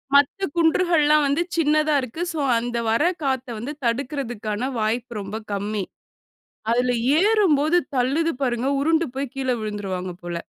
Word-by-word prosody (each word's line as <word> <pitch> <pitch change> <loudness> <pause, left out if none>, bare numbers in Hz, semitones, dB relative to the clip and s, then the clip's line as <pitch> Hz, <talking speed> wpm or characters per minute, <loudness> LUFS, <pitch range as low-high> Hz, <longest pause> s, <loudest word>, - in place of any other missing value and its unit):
மத்த 285 +8 +3
குன்றுகள்லாம் 320 -3 +3
வந்து 285 +4 +1 0.2
சின்னதா 305 -1 +3
இருக்கு. 255 +7 -6
சோ 315 - -3 0.2
அந்த 240 0 -3
வர 230 +7 +2 0.2
காத்த 265 -1 -1
வந்து 270 +7 -5
தடுக்குறதுக்கான 245 -2 -2
வாய்ப்பு 225 +1 -2
ரொம்ப 200 +2 -5 0.2
கம்மி. 205 0 -2 0.9
அதுல 245 +1 +2 0.3
ஏறும்போது 355 -7 +3 0.2
தள்ளுது 290 +7 +1
பாருங்க, 245 0 0
உருண்டு 325 +3 +2
போயி 275 +1 -1
கீழே 260 -2 0
விழுந்துருவாங்க 195 -4 -4
போல. 175 0 -5
265 Hz, 130 wpm, -23 LUFS, 225-305 Hz, 0.9 s, மத்த